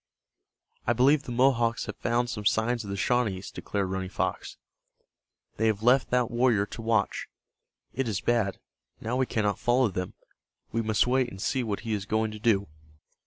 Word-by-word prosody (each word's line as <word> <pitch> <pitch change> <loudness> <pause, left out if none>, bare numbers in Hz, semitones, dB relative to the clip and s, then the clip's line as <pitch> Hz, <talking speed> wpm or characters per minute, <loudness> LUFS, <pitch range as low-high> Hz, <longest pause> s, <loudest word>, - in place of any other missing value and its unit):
"I 120 - +4
believe 135 +5 +4
the - - -6
Mohawks 120 -2 +2
have - - -6
found 120 +1 0
some 105 -3 -5
signs 115 +3 +1
of 100 - -8
the 100 - -3
Shawnees," 105 -5 0
declared 100 -2 -3
Running 95 -1 -3
Fox. - - -3 1.0
"They 110 - +2
have 110 -1 0
left 125 +3 +4
that 125 -1 +1
warrior 120 -4 +3
to 115 - -8
watch. 110 -3 0 0.7
It 135 0 -1
is 105 -4 -1
bad. 115 -5 +1 0.4
Now 115 +3 -3
we 130 0 +1
cannot 105 -2 0
follow 125 -1 +3
them. 90 -1 -4 0.6
We 115 - 0
must 110 -1 +2
wait 125 0 +2
and 95 - -10
see 130 +6 0
what 105 -3 -3
he 115 - -3
is 100 -2 -3
going 110 0 0
to 105 - -8
do." 105 -4 +2
115 Hz, 180 wpm, -27 LUFS, 105-125 Hz, 1.0 s, I